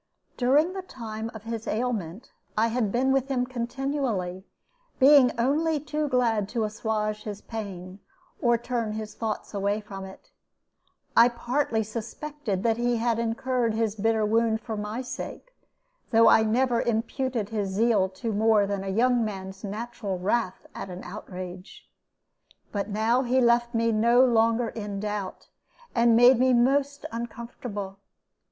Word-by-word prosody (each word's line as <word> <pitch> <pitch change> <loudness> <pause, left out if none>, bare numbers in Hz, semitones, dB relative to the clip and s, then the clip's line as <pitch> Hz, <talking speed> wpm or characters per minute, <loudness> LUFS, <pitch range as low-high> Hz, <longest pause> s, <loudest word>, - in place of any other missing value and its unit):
During 290 +8 +3
the 385 - -4
time 225 -10 -6
of 220 - -9
his 225 -1 -5
ailment 220 -3 -3 0.3
I 225 +2 +3
had 225 -3 0
been 260 +4 +2
with 270 -1 +2
him 255 -3 0
continually, 245 -7 -3 0.5
being 275 -2 +7
only 300 +5 +2
too 300 +1 -2
glad 230 -6 +1
to 230 -1 -1
assuage 215 0 -2
his 205 -2 -6
pain, 195 -4 -7 0.4
or 240 -1 +4
turn 230 -2 -2
his 215 -1 -5
thoughts 220 -1 -4
away 200 +1 0
from 200 -2 -8
it. 190 - -13 0.8
I 235 +1 +7
partly 240 -1 -1
suspected 225 0 -5
that 225 -1 +2
he 240 0 +1
had 230 0 0
incurred 235 0 0
his 220 -2 0
bitter 220 0 +1
wound 220 +1 +2
for 225 -2 -5
my 210 +4 -4
sake; 260 - -7 0.6
though 230 -1 +5
I - - +7
never 235 +2 +2
imputed 235 -1 -1
his 210 -3 -2
zeal 205 -1 +2
to 220 +4 -4
more 215 0 +4
than 200 -1 -3
a 195 - -4
young 240 +4 +3
man's 190 -2 -6
natural 210 -1 -4
wrath 190 +1 -1
at - - -7
an 180 0 -7
outrage. 185 -1 -9 0.8
But 200 0 -2
now 220 +4 +2
he 255 0 +2
left 240 0 +3
me 230 0 +2
no 235 +4 +5
longer 230 -1 +2
in 205 -3 -5
doubt, 205 -2 -5 0.4
and 235 -1 +4
made 245 +1 +7
me 255 0 +4
most 275 +4 +2
uncomfortable. 230 -4 -6
225 Hz, 150 wpm, -26 LUFS, 210-245 Hz, 0.8 s, being